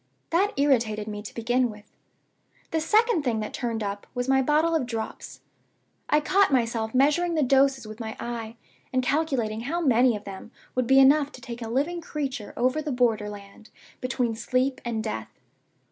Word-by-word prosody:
That 385 +5 +2
irritated 230 -7 +2
me, 210 -1 -5
to 210 - -8
begin 245 +2 +1
with. 210 -1 -11 0.9
The 320 - 0
second 435 +2 +3
thing 240 -5 0
that 215 - -5
turned 230 -3 -2
up 200 0 -5
was 245 0 -2
my 265 0 +4
bottle 305 +5 +2
of 300 -7 0
Drops. 225 -2 -6 0.7
I 300 - +4
caught 385 +4 +3
myself 230 -3 0
measuring 300 +6 +3
the 310 - +2
doses 270 -1 +3
with 215 +1 -9
my 220 -1 -5
eye, 230 -1 -5 0.4
and 255 0 +1
calculating 250 -7 0
how 300 +8 -2
many 250 -6 +4
of 210 - -7
them 195 +2 -9 0.2
would 255 -2 0
be 265 - +5
enough 280 +2 +5
to 255 - -11
take 240 -1 -8
a 225 - -5
living 300 +8 -1
creature 275 -9 -4
over 255 +5 +1
the 300 -1 -3
border 230 -4 +1
land 205 +1 -12 0.3
between 250 -3 -1
sleep 255 +3 0
and 230 -2 -2
death. 110 0 -4
250 Hz, 180 wpm, -26 LUFS, 220-285 Hz, 0.9 s, be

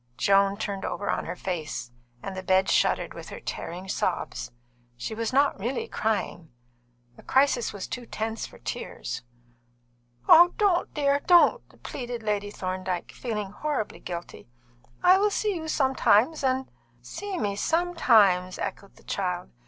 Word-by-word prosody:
Joan 195 0 +3
turned 200 -2 -4
over 205 - -2
on - - -2
her - - -4
face, 155 -9 -4 0.3
and 195 - -5
the 185 - -4
bed 190 0 +2
shuddered - - +2
with - - -9
her - - -8
tearing 180 +3 -6
sobs. - - -2 0.5
She 125 - -4
was 225 0 -2
not 280 -1 +3
really 240 +6 -2
crying. 200 -6 -2 0.7
The - - -13
crisis 265 -3 +2
was 200 -2 -6
too 245 -2 -6
tense 220 +1 -3
for - - -15
tears. 120 - -5 1.1
"Don't, 350 +2 +5
dear, 280 -1 +2
don't," 355 +7 +4
pleaded 245 -3 -5
Lady 205 -1 -1
Thorndyke, 185 -2 -4
feeling 210 -5 -4
horribly 285 -1 -3
guilty. 170 -7 -7 0.5
"I 370 +1 +7
will 415 +1 +3
see 415 0 0
you 320 -3 -5
sometimes, 265 -1 +3
and 260 0 +1 0.2
" 120 0 -35 0.2
"See 405 -2 -4
me 205 -2 -1
sometimes!" 220 - +3
echoed 200 - -6
the - - -20
child. 180 -2 -3
215 Hz, 145 wpm, -26 LUFS, 190-280 Hz, 1.1 s, I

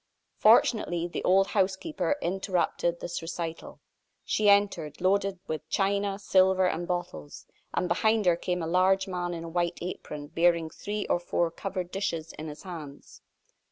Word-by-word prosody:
Fortunately, 175 -7 +4
the 175 - -5
old 195 +1 +4
housekeeper 200 - 0
interrupted 175 -2 0
this 175 - -4
recital. 165 0 -6 0.5
She 210 -1 +2
entered, 200 -7 +2
loaded 195 +1 +1
with 155 0 -5
china, 200 0 0
silver, 190 -1 +3
and 175 -1 -2
bottles, 125 - -5 0.3
and 180 - 0
behind 220 +4 +2
her 175 -1 +5
came 180 0 -2
a - - -2
large 190 +3 +3
man 175 -2 -3
in 165 - -6
a - - -6
white 175 +1 -1
apron, 150 -4 -6
bearing 165 +1 +2
three 205 +4 -4
or - - +1
four 175 -1 0
covered 185 0 -5
dishes 165 -5 -3
in 155 - -7
his 150 0 -9
hands. 155 -7 -10
180 Hz, 155 wpm, -28 LUFS, 170-195 Hz, 0.5 s, her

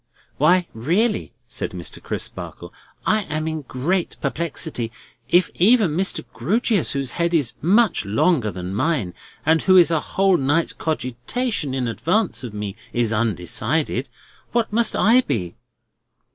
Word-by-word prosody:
"Why 175 +5 +4
really," 185 - 0 0.2
said 130 -3 -4
Mr. 90 -2 -6
Crisparkle, - - -6 0.3
"I 215 0 +3
am 155 +1 -3
in 160 -1 -2
great 155 +8 -2
perplexity. 145 -5 -3 0.4
If 175 +3 +4
even 210 -1 +4
Mr. 185 -7 0
Grewgious, 195 - +1
whose 135 -3 -2
head 170 0 0
is 140 -7 +1
much 210 +4 +3
longer 110 - +2
than 90 -1 -5
mine, 115 - 0 0.3
and 160 +1 +4
who 185 -1 +5
is 170 -2 +6
a 160 - +2
whole 190 +3 +2
night's 145 +4 +1
cogitation 150 - -2
in 125 -2 -1
advance 180 - 0
of 120 - -5
me, 105 -1 -5 0.2
is 115 -2 +1
undecided, 105 -6 -1 0.4
what 230 -3 0
must 230 0 +2
I 235 +4 +5
be!" 90 - -2
155 Hz, 140 wpm, -22 LUFS, 120-185 Hz, 0.4 s, is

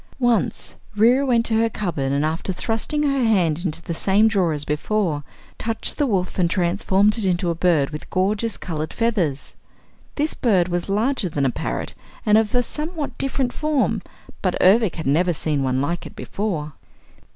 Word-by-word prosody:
Once 240 -5 0 0.2
Reera 240 +6 +4
went 235 -2 +3
to 220 - +1
her 230 0 +2
cupboard 165 -11 -2
and 140 +2 +1
after 160 +4 -2
thrusting 225 - -1
her 275 -3 +1
hand 175 -7 +2
into 165 -2 -2
the 170 - -4
same 200 +6 +3
drawer 190 -6 +2
as 150 -1 0
before, 150 0 -1 0.4
touched 225 0 -2
the 290 - +2
wolf 190 -5 -1
and 175 -2 +3
transformed 195 +4 +2
it - - -1
into 180 -1 +1
a - - 0
bird 165 -4 +2
with 150 - -8
gorgeous 205 +4 0
colored 155 -2 -4
feathers. 190 - -1 0.6
This 305 +1 -1
bird 190 -8 +2
was 175 +2 -2
larger 215 0 0
than 145 -3 -1
a 130 - +2
parrot - - -4 0.3
and 210 - +5
of 220 +1 +2
a 245 - +3
somewhat 305 +3 -5
different 265 -2 -1
form, 305 -3 0 0.4
but - - 0
Ervic 200 0 +4
had 160 - -5
never 170 +6 +2
seen 150 -2 -1
one 130 0 0
like 170 +5 -2
it - - -15
before. 165 -8 -3
195 Hz, 180 wpm, -22 LUFS, 165-230 Hz, 0.6 s, and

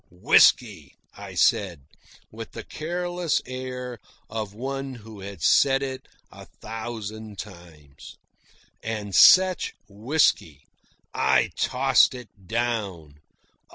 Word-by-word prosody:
"Whisky," 90 +1 +3 0.2
I - - -10
said, 90 -7 +1 0.5
with 115 0 -9
the - - -7
careless 175 +1 -2
air 125 -1 -6 0.3
of 110 -2 -4
one 135 +4 -5
who 110 -2 -12
had 95 -4 -9
said 135 +6 +4
it 130 -1 -6 0.2
a - - -13
thousand 110 -1 -8
times. 85 -8 -12 0.7
And 105 -3 -5
such 185 - +5
whisky! 105 - 0 0.5
I 65 -1 +2
tossed 130 0 +3
it 110 -6 -14
down. 100 -10 -3
110 Hz, 100 wpm, -24 LUFS, 100-130 Hz, 0.7 s, such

